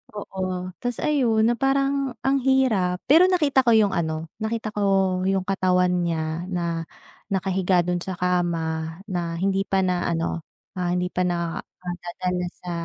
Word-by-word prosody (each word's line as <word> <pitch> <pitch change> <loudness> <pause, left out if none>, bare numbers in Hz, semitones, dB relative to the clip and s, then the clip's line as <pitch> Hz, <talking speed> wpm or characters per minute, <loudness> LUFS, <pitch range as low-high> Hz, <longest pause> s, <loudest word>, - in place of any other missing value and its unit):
Oo, 185 -2 -4
tapos 245 -1 -3
ayon 240 -7 +2
na 235 +2 +3
parang 275 -1 +1
ang 275 +1 +2
hirap. 240 -9 +2
Pero 340 +5 +8
nakita 300 -8 +3
ko 235 -3 +4
yung 210 -3 +4
ano, 160 -2 -2
nakita 220 0 -2
ko 210 - -3 0.5
yung 195 -1 +1
katawan 180 -1 +2
niya 165 0 -2
na 170 -3 -2 0.4
nakahiga 190 -2 +1
do'n 180 0 -1
sa 185 +1 -5
kama, 165 -2 -1
na 175 -4 -3
hindi 195 +2 0
pa 190 -1 +2
na 180 -1 0
ano, 165 -1 -2 0.3
ah, 175 0 0
hindi 180 0 -1
pa 180 0 0
na, 170 -1 -2 0.2
nadadala 180 0 -3 0.2
sa 180 - -5
185 Hz, 155 wpm, -24 LUFS, 175-220 Hz, 0.5 s, Pero